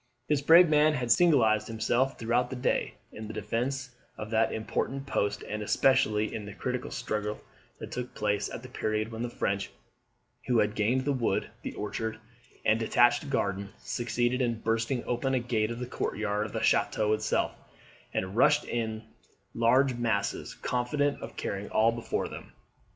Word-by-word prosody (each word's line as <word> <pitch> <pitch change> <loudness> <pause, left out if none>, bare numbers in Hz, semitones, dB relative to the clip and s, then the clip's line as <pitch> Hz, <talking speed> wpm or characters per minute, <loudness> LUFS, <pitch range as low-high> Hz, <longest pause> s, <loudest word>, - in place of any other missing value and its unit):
This 150 -2 +2
brave 165 +4 +8
man 155 0 +4
had 125 -3 -1
signalised 120 -11 +4
himself, 120 +4 0
throughout 120 +2 +1
the 130 - -5
day, 125 - 0 0.2
in 110 0 -8
the 110 - -7
defence 125 +5 -2 0.3
of 110 +1 -6
that 110 0 +2
important 135 +5 -2
post, 105 -6 -1
and 105 0 -4
especially 110 -2 +2
in 110 - -4
the 100 0 -9
critical 125 -1 -3
struggle 105 0 -3 0.4
that - - -8
took 125 0 -5
place 105 -1 0
at - - -7
the - - -8
period 110 +1 -2
when 115 0 -5
the 120 - -2
French, 100 -4 -2 0.8
who 125 -2 +3
had 105 -1 +2
gained 120 +5 +1
the 145 - +2
wood, 115 -7 -1
the - - -6
orchard, 110 +1 -3 0.5
and 110 +1 +4
detached 120 +4 +3
garden, 100 -6 -1
succeeded 120 +1 -1
in 115 -2 -1
bursting 115 +3 0
open 130 +2 0
a - - +2
gate 115 -3 0
of 115 - -4
the 125 - -4
courtyard 105 -3 -2
of - - -12
the - - -2
chateau 105 0 +2
itself, 110 0 0 0.6
and 95 +2 -3
rushed 115 - +4
in 120 - -2
in 110 -1 -3 0.5
large 125 +3 +3
masses, 110 -4 -1
confident 140 +4 -1
of 115 - -8
carrying 100 +1 -4
all 115 +1 +4
before 115 0 -2
them. - - -10
115 Hz, 175 wpm, -29 LUFS, 110-125 Hz, 0.8 s, brave